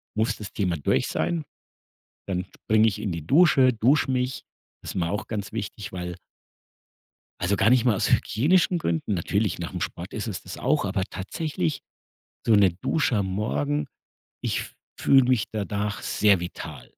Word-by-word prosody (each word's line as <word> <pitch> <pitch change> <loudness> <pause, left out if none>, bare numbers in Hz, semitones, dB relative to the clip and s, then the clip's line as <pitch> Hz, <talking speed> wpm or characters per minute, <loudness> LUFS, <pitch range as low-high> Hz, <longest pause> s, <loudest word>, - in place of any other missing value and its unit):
muss 110 +1 0
das 105 - -8
Thema 90 -5 0
durch 70 - +1
sein. 170 -3 -1 0.8
Dann 90 -2 -2 0.2
springe 110 +1 +4
ich 100 - -3
in 100 -5 -2
die 80 -2 -6
Dusche, 140 - +5
dusche 130 +5 +2
mich. 130 0 -1 0.4
Das - - -6
ist - - -7
mir 85 -2 0
auch 105 - -3
ganz 105 -3 -4
wichtig, 105 -1 -5
weil 90 -1 -5 1.2
Also 95 +4 +1
gar 110 - +4
nicht 125 -1 +4
mal 120 - +4
aus - - 0
hygienischen 175 +8 +3
Gründen 85 - -1
natürlich 100 +2 0
nach'm 90 +1 -5
Sport 85 +2 -5
ist 110 - -3
es 95 - -5
das - - -8
auch, - - +1
aber 95 -1 -1
tatsächlich 95 - -3 0.7
so 115 - +4
'ne 100 -4 +6
Dusche 145 -7 +1
am 100 -2 0
Morgen, 145 +9 -1 0.5
ich - - -2 0.3
fühle 135 -2 +5
mich 125 -4 +2
danach 105 0 -2
sehr 100 -4 +3
vital. 80 -6 -7
105 Hz, 165 wpm, -25 LUFS, 95-125 Hz, 1.2 s, ne